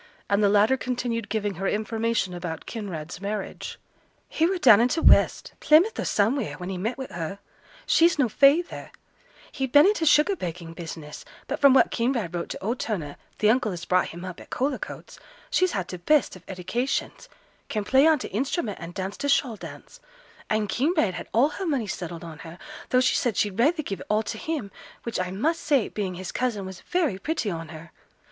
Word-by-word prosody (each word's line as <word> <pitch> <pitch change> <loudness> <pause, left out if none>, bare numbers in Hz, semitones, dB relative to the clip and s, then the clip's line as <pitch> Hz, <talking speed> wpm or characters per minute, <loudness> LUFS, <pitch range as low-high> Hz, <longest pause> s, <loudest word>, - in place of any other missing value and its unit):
And 200 +1 +3
the 200 - +5
latter 210 +6 +4
continued 240 -4 -3
giving 210 -2 -1
her 195 - 0
information 220 -2 -1
about 175 -2 -5
Kinraid's 180 -6 -6
marriage. 205 0 -5 0.5
'He 325 - +2
were 380 +1 0
down 235 - +7
in 240 - +4
t' 300 +6 -1
west, - - +4
Plymouth 330 +9 +4
or - - -1
somewheere, 220 +4 +1
when 180 0 -6
he 190 - -3
met 225 +7 -2
wi' 265 - -4
her. 170 +2 -5 0.5
She's 335 0 +4
no 275 -4 +3
feyther; 285 +9 +3 0.6
he'd 265 -3 -3
been 290 +3 +7
in 405 - +5
t' 330 -6 -2
sugar 300 +6 +4
baking 170 - -6
business; 160 -3 -8 0.2
but 285 - -4
from 280 -2 +6
what - - +5
Kinraid 230 -7 -1
wrote 170 -1 -3
to - - -7
old 230 +5 -1
Turner, 160 -10 -3 0.2
th' - - -16
uncle 220 0 +3
as 175 -1 -6
brought 185 0 +2
him 175 +2 -8
up 185 -2 -7
at - - -13
Cullercoats, 265 +1 -4 0.3
she's 370 -7 +2
had 185 -4 -2
t' 180 - -6
best 285 - +2
of 185 - -14
edications: 215 +8 -3 0.4
can 215 -2 -2
play 265 +8 +4
on 320 -1 +5
t' - - -6
instrument 240 - -2
and 170 +1 -8
dance 190 +1 -4
t' 285 - -3
shawl 270 -4 +2
dance; - - -11 0.5
and 215 -1 +1
Kinraid 260 - +1
had - - -7
all 250 +6 +4
her 385 +5 -5
money 275 -8 0
settled 175 -4 -6
on 165 -2 -9
her, 165 +1 -10 0.3
though 255 - +4
she 255 - +3
said 235 -6 0
she'd 205 -1 0
rayther 310 +6 +3
give 195 -7 -5
it - - -10
all 215 +1 +2
to 220 - -5
him, 295 -11 -4 0.3
which 235 -4 -3
I 185 0 -1
must 300 - -1
say, 285 -6 +2
being 190 -4 -3
his 185 0 -6
cousin, 230 -6 -2
was 190 -1 -9
very 320 - -1
pretty 265 -4 -2
on 165 -1 -5
her. 160 0 -11
215 Hz, 205 wpm, -25 LUFS, 185-275 Hz, 0.6 s, down